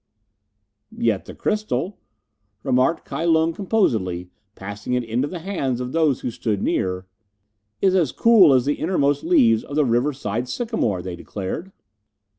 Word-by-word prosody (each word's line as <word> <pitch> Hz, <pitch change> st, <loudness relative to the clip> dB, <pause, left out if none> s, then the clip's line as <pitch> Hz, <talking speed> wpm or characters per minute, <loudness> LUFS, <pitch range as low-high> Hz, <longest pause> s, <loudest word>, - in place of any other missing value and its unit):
"Yet 110 Hz, -5 st, 0 dB
the -, -, -10 dB
crystal 210 Hz, -2 st, -2 dB, 0.3 s
" 100 Hz, +1 st, -49 dB
remarked 130 Hz, +6 st, +1 dB
Kai 165 Hz, -, -4 dB
Lung 165 Hz, 0 st, +3 dB
composedly, 110 Hz, -, 0 dB, 0.2 s
passing 105 Hz, +5 st, -6 dB
it 125 Hz, 0 st, +1 dB
into 120 Hz, +5 st, -1 dB
the 180 Hz, -, -6 dB
hands 160 Hz, -9 st, -2 dB
of 125 Hz, 0 st, -4 dB
those 155 Hz, -4 st, +1 dB
who 125 Hz, -, -3 dB
stood 110 Hz, -3 st, -2 dB
near. 90 Hz, 0 st, -1 dB, 0.8 s
"Is 190 Hz, -1 st, +4 dB
as 170 Hz, -8 st, +2 dB
cool 220 Hz, -9 st, +6 dB
as 130 Hz, -2 st, +3 dB
the 145 Hz, +1 st, -1 dB
innermost 145 Hz, -4 st, +1 dB
leaves 115 Hz, -10 st, +4 dB
of 145 Hz, -, -8 dB
the 150 Hz, -1 st, +3 dB
riverside 120 Hz, -2 st, -1 dB
sycamore," 125 Hz, -, -1 dB
they 90 Hz, -2 st, -5 dB
declared. 105 Hz, -, -6 dB
130 Hz, 150 wpm, -22 LUFS, 110-165 Hz, 0.8 s, cool